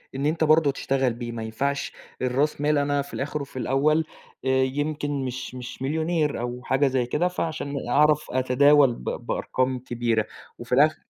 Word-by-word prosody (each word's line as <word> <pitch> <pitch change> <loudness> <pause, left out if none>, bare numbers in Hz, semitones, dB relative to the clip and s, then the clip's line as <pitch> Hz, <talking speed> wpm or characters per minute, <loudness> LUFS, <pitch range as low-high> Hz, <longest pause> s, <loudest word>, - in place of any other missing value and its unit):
إن 135 +1 -2
أنت 160 +2 +1
برضه 155 -1 +4
تشتغل 135 -2 0
بيه، 120 0 -6
ما 115 -1 -5
ينفعش 140 +6 -2 0.3
الراس 135 +4 0
مال 150 0 +2
أنا 145 0 +1
في 140 - -10
الآخر 145 +2 -3
وفي 135 -2 -7
الأول 150 +5 +2 0.4
آآ 130 - +1
يمكن 145 0 -2
مش 130 0 -5
مش 125 0 -8
مليونير 155 +1 0
أو 125 +1 -4
حاجة 135 +3 +2
زي 130 -2 +1
كده، 150 +8 0
فعشان 160 -5 -3
أعرف 150 +3 +4
أتداول 130 +1 +4
ب - - -12
بأرقام 130 - -2
كبيرة، 120 -3 -1 0.3
وفي 120 0 -11
الآخر 155 +3 +3
140 Hz, 165 wpm, -25 LUFS, 125-150 Hz, 0.4 s, برضه